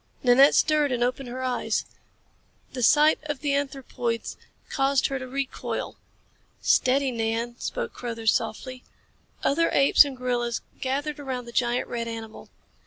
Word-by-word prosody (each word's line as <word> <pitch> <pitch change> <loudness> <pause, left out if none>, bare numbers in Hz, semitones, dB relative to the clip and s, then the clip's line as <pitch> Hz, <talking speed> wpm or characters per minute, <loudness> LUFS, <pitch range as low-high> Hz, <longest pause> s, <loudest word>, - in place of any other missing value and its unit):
Nanette 265 +3 +6
stirred 300 -3 +3
and 240 -1 0
opened 250 +1 -2
her 255 +2 -5
eyes. 250 -1 -1 0.9
The 255 - -4
sight 300 +6 +5
of 295 -3 -4
the 290 -2 0
anthropoids 265 -4 -3 0.3
caused 275 -1 +1
her 270 -1 -1
to 255 - -7
recoil. 270 +1 -4 0.6
"Steady, 265 +1 +2
Nan," 230 +1 -2
spoke 485 -2 -4
Carruthers 230 -2 -1
softly. 250 +3 -3 0.6
Other 330 +4 +2
apes 275 +2 +6
and 280 -3 -6
gorillas 240 -2 -1 0.2
gathered 285 +3 -2
around 260 -3 -4
the 235 - -10
giant 240 +1 0
red 235 -1 -4
animal. 225 -1 -8
255 Hz, 140 wpm, -25 LUFS, 240-280 Hz, 0.9 s, Nanette